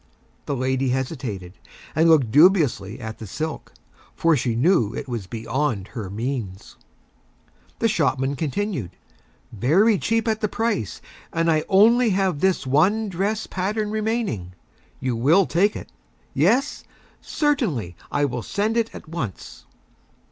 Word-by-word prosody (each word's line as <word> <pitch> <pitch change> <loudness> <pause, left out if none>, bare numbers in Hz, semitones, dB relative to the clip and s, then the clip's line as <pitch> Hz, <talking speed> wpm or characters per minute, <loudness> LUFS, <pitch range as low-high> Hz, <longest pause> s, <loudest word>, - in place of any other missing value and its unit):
The 140 - -1
Lady 130 +1 0
hesitated, 125 - -4 0.3
and 160 +2 +3
looked 140 -9 +4
Dubiously 145 - +4
at 110 0 -7
the 110 - -7
Silk, 155 +9 -5 0.4
for 165 -1 +3
she 120 -4 -1
knew 120 - +2
it 140 - -5
was 115 -7 -5
Beyond 115 -1 -2
her 105 -6 -6
Means. 110 -3 -5 1.0
The 230 - +2
Shopman 140 - 0
Continued: 150 - -3 0.5
"Very 180 - +3
Cheap 225 0 0
at 220 -1 0
the 215 - +1
Price, 225 - -2 0.3
and 165 0 +1
I 155 - +3
have 155 - -2
Only 230 +5 +5 0.3
this 190 -3 +1
One 190 +11 +2
Dress 200 +4 -1
Pattern 210 +3 -2
remaining. 215 - -2 0.5
You 130 -2 -1
will 155 +12 +4
Take 200 +6 +2
it? - - -8 0.4
Yes? 275 +4 +1 0.4
Certainly, 185 - -1 0.2
I 145 - +1
will 125 -3 -3
Send 215 - -1
it 230 -1 +1
at - - -10
Once." 150 - -6
155 Hz, 135 wpm, -23 LUFS, -, 1.0 s, Only